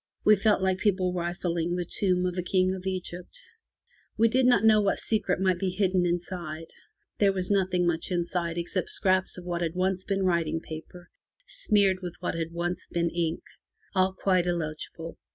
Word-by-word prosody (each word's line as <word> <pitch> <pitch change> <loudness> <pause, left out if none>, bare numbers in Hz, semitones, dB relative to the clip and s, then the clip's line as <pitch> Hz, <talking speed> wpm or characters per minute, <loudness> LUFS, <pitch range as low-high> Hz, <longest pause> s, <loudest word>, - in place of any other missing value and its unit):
We 215 - +7
felt 205 -1 +2
like 190 0 +1
people 185 -3 +1
rifling 175 -1 -2
the 180 -1 -2
tomb 180 0 +1
of 180 -1 -1
a 180 - -1
King 185 +1 +1
of 190 0 -6
Egypt. 185 - -5 0.8
We 230 +1 +4
did 255 +2 +3
not 245 -4 +4
know 215 -1 +6
what 200 -1 +1
secret 215 -5 0
might 185 -2 +1
be 190 - 0
hidden 185 -1 +1
inside. 170 -2 -4 0.5
There 200 -1 +5
was 185 0 -2
nothing 185 -3 +2
much 170 -1 -1
inside 175 -1 -1
except 175 +1 -2
scraps 185 0 +1
of 180 - -9
what 175 -1 -2
had 165 0 -2
once 185 0 0
been 195 -1 -1
writing 170 -3 +1
paper 165 +2 -10 0.4
smeared 205 - +2
with 180 -2 -6
what 180 - -2
had 165 -1 -3
once 175 +1 -3
been 170 -1 0
ink. 170 -1 -2 0.5
All 185 0 +3
quite 185 -2 +1
illegible. 165 -1 -4
180 Hz, 180 wpm, -27 LUFS, 175-190 Hz, 0.8 s, We